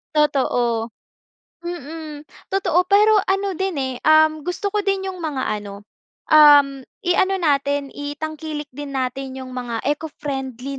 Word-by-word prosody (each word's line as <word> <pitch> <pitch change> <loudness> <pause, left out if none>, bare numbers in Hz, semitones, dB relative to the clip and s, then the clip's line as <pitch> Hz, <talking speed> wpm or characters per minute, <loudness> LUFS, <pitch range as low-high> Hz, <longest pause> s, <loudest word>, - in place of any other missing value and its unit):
Totoo, 245 -6 +1 0.7
mm. 315 -2 -7 0.3
Totoo, 360 -2 +2
pero 420 +2 +5
ano 390 -2 -1
din, 385 -1 -1
eh, 260 -1 -3
um, 310 0 +4
gusto 360 +3 -2
ko 420 - -1
din 390 -1 -1
yung 370 - -9
mga 305 -6 -3 0.2
ano, 200 -1 -9 0.5
um, 285 -3 +6 0.2
iano 370 +2 +2
natin 285 -5 0
itangkilik 295 +1 -6
din 280 +1 -8
natin 265 0 -3
yung 255 - -9
mga 245 -3 -4
eco-friendly 275 -3 -4
295 Hz, 130 wpm, -21 LUFS, 270-350 Hz, 0.7 s, um